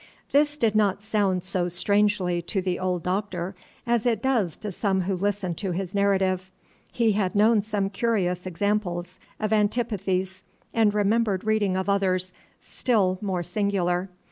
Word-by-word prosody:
This 295 +1 +3
did 230 -7 +2
not 205 -2 +2
sound 200 -4 +1
so 185 -1 -1
strangely 190 -1 +1
to 190 +3 -3
the 185 -1 -1
old 180 -2 -1
Doctor 185 -1 -2 0.3
as 235 -2 +1
it 235 -4 +1
does 230 - +1
to 210 -1 -5
some 190 0 0
who 190 +1 -1
listen 195 -1 -1
to 185 +1 -3
his 185 +1 -4
narrative. 190 -2 +1 0.4
He 230 -2 +2
had 200 -1 0
known 215 +1 +5
some 200 -2 -2
curious 190 -5 0
examples 185 -1 -2 0.2
of 215 0 0
antipathies, 200 -4 0 0.3
and 220 -2 +4
remembered 210 -1 +1
reading 210 -3 +1
of 190 - -2
others 185 -2 +1 0.3
still 195 -7 0
more 190 -4 -1
singular. 185 -1 0
195 Hz, 150 wpm, -25 LUFS, 185-210 Hz, 0.4 s, known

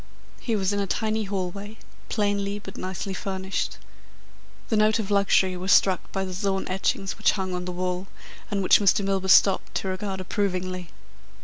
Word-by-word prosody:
He 230 - -1
was 195 -1 0
in 205 - 0
a 200 - -1
tiny 220 +2 -1
hallway, 200 +2 -4 0.3
plainly 205 -1 0
but 200 -2 -10
nicely 190 +1 -4
furnished. 190 -1 -3 0.9
The 225 - +2
note 215 +1 +4
of 210 -2 -3
luxury 195 -2 +3
was 185 +2 -1
struck 190 -2 +3
by 195 -1 -2
the 185 - -6
Zohn 195 0 -1
etchings 195 +2 -1
which 215 - +4
hung 190 -2 -3
on 180 0 -3
the 180 - -3
wall, 180 +1 -3 0.4
and 200 -2 -1
which - - +6
Mr. 200 0 +3
Milburgh 195 -1 0
stopped 195 0 +5
to 190 - -1
regard 190 0 -3
approvingly. 185 -2 -2
195 Hz, 175 wpm, -25 LUFS, 185-205 Hz, 0.9 s, which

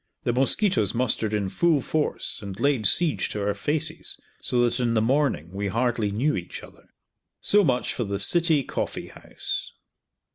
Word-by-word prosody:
The 120 - 0
mosquitoes 135 - +2
mustered 115 -3 0
in 105 -2 -1
full 165 - +2
force 150 -3 -2
and 100 -2 -8
laid 140 -7 +2
siege 165 - +2
to 105 - -4
our 105 - +1
faces, 155 +9 -2 0.2
so 120 -1 +2
that 120 +1 -2
in 120 -2 0
the - - +4
morning 120 - 0
we 100 +1 -3
hardly 115 0 0
knew 125 +10 0
each 85 -2 -6
other. - - -16 0.5
So 205 0 +3
much 125 -7 0
for 120 - -2
the 100 -2 -3
City 160 - +4
Coffee - - -4
House. - - -6
120 Hz, 170 wpm, -25 LUFS, 105-150 Hz, 0.5 s, the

